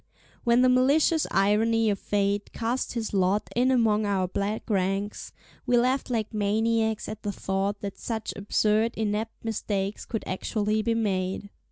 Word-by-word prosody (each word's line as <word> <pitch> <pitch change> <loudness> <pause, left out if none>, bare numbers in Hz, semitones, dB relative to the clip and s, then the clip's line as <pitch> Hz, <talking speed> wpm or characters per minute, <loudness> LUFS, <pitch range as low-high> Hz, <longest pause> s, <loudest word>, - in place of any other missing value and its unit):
When 240 +1 +4
the - - +6
malicious 280 +5 +3
irony 220 +3 +2
of 200 - -2
fate 200 0 -1
cast 235 +3 -2
his 230 -3 -3
lot 195 +1 +1
in 250 +2 +3
among 225 -4 +3
our 190 -2 +1
black 200 +4 -3
ranks, 195 0 -1 0.4
we 245 0 +4
laughed 255 +3 +1
like 225 -3 -2
maniacs 220 +1 +1
at 215 0 -6
the 205 - -2
thought 195 +1 -2
that 200 -1 -6
such 220 -2 -4
absurd 215 +2 +1
inept 220 +1 -2
mistakes 205 -2 -2
could 225 - -4
actually 215 +3 -1
be 230 +1 0
made. 195 -2 -1
215 Hz, 155 wpm, -26 LUFS, 200-230 Hz, 0.4 s, the